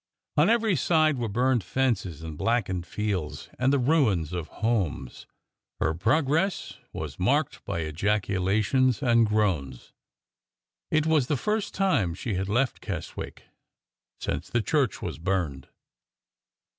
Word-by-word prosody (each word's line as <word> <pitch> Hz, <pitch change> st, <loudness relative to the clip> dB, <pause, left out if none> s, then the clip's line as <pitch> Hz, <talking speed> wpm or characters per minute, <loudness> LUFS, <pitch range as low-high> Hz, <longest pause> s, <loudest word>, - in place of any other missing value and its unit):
On -, -, +4 dB
every 225 Hz, -4 st, +3 dB
side 155 Hz, -2 st, +3 dB
were 115 Hz, -2 st, -1 dB
burned 125 Hz, +1 st, +2 dB
fences 95 Hz, -, -1 dB
and 80 Hz, -2 st, -6 dB
blackened 95 Hz, -2 st, 0 dB
fields 100 Hz, -7 st, -3 dB
and 130 Hz, +1 st, +3 dB
the 140 Hz, -, +3 dB
ruins 120 Hz, -, +2 dB
of 85 Hz, -3 st, -3 dB
homes. 100 Hz, -, -2 dB, 0.5 s
Her 80 Hz, -, +1 dB
progress 150 Hz, -, 0 dB
was -, -, -6 dB
marked -, -, +1 dB
by 85 Hz, -, -2 dB
ejaculations 105 Hz, -, +1 dB
and 115 Hz, -3 st, +4 dB
groans. 90 Hz, -, -1 dB, 1.0 s
It 155 Hz, 0 st, +2 dB
was 155 Hz, -5 st, +3 dB
the 145 Hz, -, +1 dB
first 210 Hz, -, -1 dB
time 115 Hz, -, +1 dB
she 110 Hz, +4 st, -3 dB
had 95 Hz, +1 st, -2 dB
left 125 Hz, +5 st, +1 dB
Keswick 90 Hz, -6 st, -6 dB, 0.8 s
since -, -, -3 dB
the 120 Hz, -1 st, 0 dB
church 140 Hz, -, 0 dB
was -, -, -4 dB
burned. 80 Hz, -7 st, -2 dB
110 Hz, 130 wpm, -27 LUFS, 90-135 Hz, 1.0 s, On